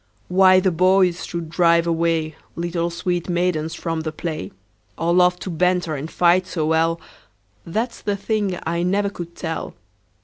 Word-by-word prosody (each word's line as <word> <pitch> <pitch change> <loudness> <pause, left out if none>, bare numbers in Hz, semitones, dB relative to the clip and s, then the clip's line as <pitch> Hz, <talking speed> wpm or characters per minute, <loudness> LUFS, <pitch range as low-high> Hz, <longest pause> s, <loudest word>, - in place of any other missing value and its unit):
Why 185 0 +6
the 185 0 +2
boys 180 +1 +3
should 170 -2 -5
drive 170 -1 +3
away 165 -1 0 0.2
Little 170 0 -2
sweet 175 +1 -2
maidens 170 -2 0
from 165 -2 -3
the 155 0 -3
play, 155 - -5 0.5
Or 170 +1 +1
love 180 0 +4
to 185 - -4
banter 180 -1 +1
and 150 +2 -5
fight 180 +2 +3
so 160 -4 -2
well, 165 +1 +1 0.7
That 225 +8 -2
's - - -14
the 205 -1 -1
thing 200 -3 -1
I 170 +1 -1
never 200 +3 +1
could 170 -3 -8
tell. 160 -2 -5
170 Hz, 165 wpm, -21 LUFS, 165-185 Hz, 0.7 s, Why